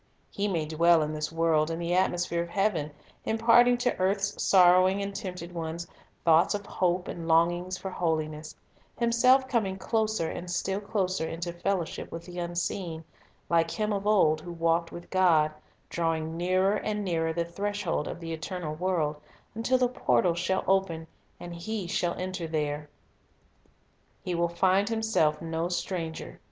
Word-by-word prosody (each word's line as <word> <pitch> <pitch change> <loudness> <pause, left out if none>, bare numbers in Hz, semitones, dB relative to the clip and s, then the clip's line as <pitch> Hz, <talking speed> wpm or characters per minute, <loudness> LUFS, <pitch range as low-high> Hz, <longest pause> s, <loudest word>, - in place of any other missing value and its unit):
He 205 +1 -1
may 170 -6 -1
dwell 165 +1 +4
in 150 +1 -3
this 150 0 -3
world 165 -1 +2
in 165 - -3
the 170 +1 -2
atmosphere 175 -2 +1
of 170 - -5
heaven, 170 -5 0 0.3
imparting 235 +2 +4
to 245 +1 0
earth's 195 +2 0
sorrowing 185 +1 +5
and 200 0 -3
tempted 180 -4 -6
ones 165 0 -4 0.4
thoughts 165 +3 +5
of 205 -1 -5
hope 180 -1 0
and 165 -1 -6
longings 175 +3 +2
for 190 - -6
holiness; 155 -3 -2 0.4
himself 250 +3 +4
coming 210 -7 0
closer 220 -4 0
and 175 +2 -6
still 190 +2 -1
closer 190 -5 -1
into 170 +1 -4
fellowship 175 -1 -3
with 165 0 -7
the 180 0 -7
Unseen; 175 -1 -3 0.4
like 165 -1 +2
him 215 +3 -1
of 200 0 -2
old 160 -7 +4
who 175 - -8
walked 165 0 0
with 170 - -9
God, 165 -5 +4 0.4
drawing 165 -1 -1
nearer 185 +3 +2
and 210 -1 -3
nearer 165 -3 0
the 170 +1 -1
threshold 200 -2 -2
of - - -6
the 165 -1 -5
eternal 160 0 -4
world, 160 -3 -1 0.4
until 230 +4 +1
the 250 -1 +3
portals 170 - +1
shall 190 +2 0
open, 190 -4 +1 0.3
and 175 0 -8
he 195 +4 -4
shall 175 -2 -1
enter 185 -2 -4
there. 150 -1 -2 1.3
He 180 - -2
will 170 0 +1
find 190 +4 +2
himself 220 -10 +1
no 165 +1 -2
stranger. 175 -2 -4
175 Hz, 160 wpm, -28 LUFS, 165-195 Hz, 1.3 s, sorrowing